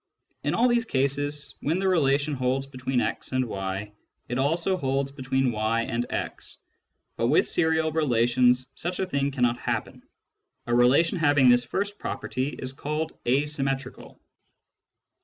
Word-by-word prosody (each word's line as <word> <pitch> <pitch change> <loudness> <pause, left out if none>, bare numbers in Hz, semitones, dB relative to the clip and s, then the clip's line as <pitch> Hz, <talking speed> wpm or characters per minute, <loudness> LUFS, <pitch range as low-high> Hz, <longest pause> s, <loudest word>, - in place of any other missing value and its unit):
In - - 0
all 245 - +4
these 240 -1 +2
cases, 145 -1 -1
when 160 +4 0
the 190 0 0
relation 145 -4 +2
holds 130 0 0
between 130 -2 -2
x - - -3
and 130 0 +1
y, 95 -1 -4 0.4
it 120 +1 -2
also 165 +7 +1
holds 135 -4 -1
between 130 -1 0
y 110 +1 0
and 115 +1 -2
x. - - -5 0.6
But - - +1
with - - +3
serial 160 -1 +1
relations 125 -3 +2
such 175 +5 -4
a 190 - +1
thing 140 -6 0
cannot 125 -3 0
happen. - - -3 0.6
A 120 - -2
relation 135 +9 +4
having 145 -4 +5
this 120 0 +5
first 200 - -3
property 130 +1 -3
is 130 -2 -5
called 150 +3 -3
asymmetrical. 135 0 -1
135 Hz, 145 wpm, -26 LUFS, 125-155 Hz, 0.6 s, having